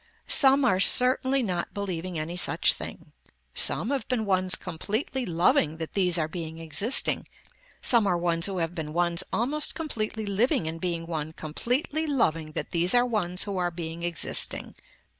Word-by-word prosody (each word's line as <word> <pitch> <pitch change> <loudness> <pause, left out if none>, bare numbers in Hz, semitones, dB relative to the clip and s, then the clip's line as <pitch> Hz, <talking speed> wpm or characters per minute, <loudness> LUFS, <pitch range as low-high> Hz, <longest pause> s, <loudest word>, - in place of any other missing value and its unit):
Some 275 0 +5
are 190 -7 +2
certainly 260 +4 +5
not 180 -5 -3
believing 185 -3 -4
any 155 +3 -4
such 180 - +2
thing. - - -9 0.4
Some 235 - +3
have 270 -5 -2
been 240 -4 -1
ones 185 -2 +1
completely 215 - -3
loving 165 -2 +1
that 160 -1 -7
these 180 -3 +1
are 155 -2 0
being 160 -1 -7
existing, 165 - +1 0.6
some 235 -5 +4
are 180 - +1
ones 170 0 +1
who 195 -2 -5
have 165 0 -2
been 155 -3 -6
ones 170 0 +1
almost 290 +6 0
completely 220 -8 -3
living 215 - 0
in 160 +1 -5
being 170 -1 -3
one 160 -2 -5
completely 250 - -2
loving 165 - -1
that - - -5
these 175 +5 +2
are 245 0 +4
ones 185 -7 -1
who 200 -2 -4
are 175 -1 0
being 165 -1 -7
existing. 170 -2 0
180 Hz, 165 wpm, -26 LUFS, 165-235 Hz, 0.6 s, Some